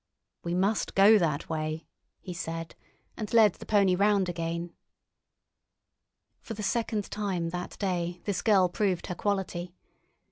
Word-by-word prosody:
"We 170 Hz, 0 st, -2 dB
must 195 Hz, +4 st, 0 dB
go 205 Hz, +2 st, +7 dB
that 155 Hz, -4 st, -1 dB
way," 155 Hz, 0 st, -3 dB, 0.4 s
he 180 Hz, -, -6 dB
said, 165 Hz, -1 st, -5 dB, 0.4 s
and 215 Hz, -3 st, -5 dB
led 220 Hz, -5 st, +6 dB
the -, -, -12 dB
pony 200 Hz, -3 st, +4 dB
round 200 Hz, -1 st, +3 dB
again. 170 Hz, 0 st, -3 dB, 1.7 s
For 225 Hz, -, -7 dB
the 210 Hz, -, -5 dB
second 215 Hz, 0 st, -1 dB
time 190 Hz, -5 st, -2 dB
that 180 Hz, +1 st, -6 dB
day 180 Hz, -3 st, -2 dB
this 200 Hz, -3 st, -2 dB
girl 195 Hz, -5 st, +4 dB
proved 185 Hz, -1 st, -1 dB
her 180 Hz, -, -4 dB
quality. 180 Hz, -3 st, -2 dB
185 Hz, 140 wpm, -28 LUFS, 170-205 Hz, 1.7 s, go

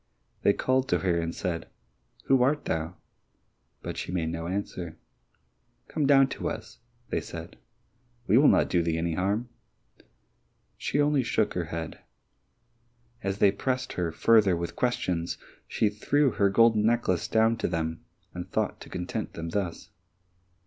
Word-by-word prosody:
They 100 Hz, -, +4 dB
called 130 Hz, +3 st, +1 dB
to -, -, +2 dB
her 90 Hz, -3 st, +1 dB
and 85 Hz, 0 st, -3 dB
said, 85 Hz, -3 st, -3 dB, 0.6 s
"Who 135 Hz, -1 st, +4 dB
art 145 Hz, +4 st, +2 dB
thou?" 80 Hz, +2 st, -2 dB, 0.9 s
But -, -, -5 dB
she -, -, -4 dB
made 85 Hz, -3 st, -1 dB
no 85 Hz, 0 st, -4 dB
answer. 90 Hz, -3 st, -4 dB, 0.9 s
"Come 150 Hz, -3 st, 0 dB
down 135 Hz, -1 st, +6 dB
to -, -, -3 dB
us," -, -, -8 dB, 0.4 s
said -, -, -8 dB
they. -, -, -20 dB, 0.7 s
"We 105 Hz, -, +4 dB
will 145 Hz, -, +6 dB
not -, -, +5 dB
do 90 Hz, -, +2 dB
thee 80 Hz, -1 st, 0 dB
any 85 Hz, 0 st, -1 dB
harm." 100 Hz, +8 st, -1 dB, 1.3 s
She 145 Hz, -, -2 dB
only 145 Hz, -1 st, +3 dB
shook 110 Hz, -3 st, 0 dB
her 90 Hz, -2 st, -2 dB
head. 80 Hz, 0 st, -5 dB, 1.2 s
As 100 Hz, 0 st, -2 dB
they 100 Hz, -1 st, +5 dB
pressed 130 Hz, +5 st, -2 dB
her 85 Hz, -2 st, -1 dB
further 100 Hz, 0 st, +4 dB
with 85 Hz, 0 st, -4 dB
questions 90 Hz, -9 st, -1 dB, 0.3 s
she 110 Hz, -, +1 dB
threw 135 Hz, +7 st, +2 dB
her 100 Hz, -2 st, +2 dB
golden 110 Hz, +1 st, +4 dB
necklace 110 Hz, -6 st, +1 dB
down 110 Hz, +1 st, +3 dB
to -, -, -1 dB
them, 80 Hz, -1 st, -3 dB, 0.3 s
and 90 Hz, 0 st, -6 dB
thought -, -, -1 dB
to -, -, -10 dB
content 90 Hz, -1 st, -4 dB
them 85 Hz, 0 st, -5 dB
thus. 90 Hz, -2 st, -3 dB
95 Hz, 155 wpm, -28 LUFS, 85-120 Hz, 1.3 s, down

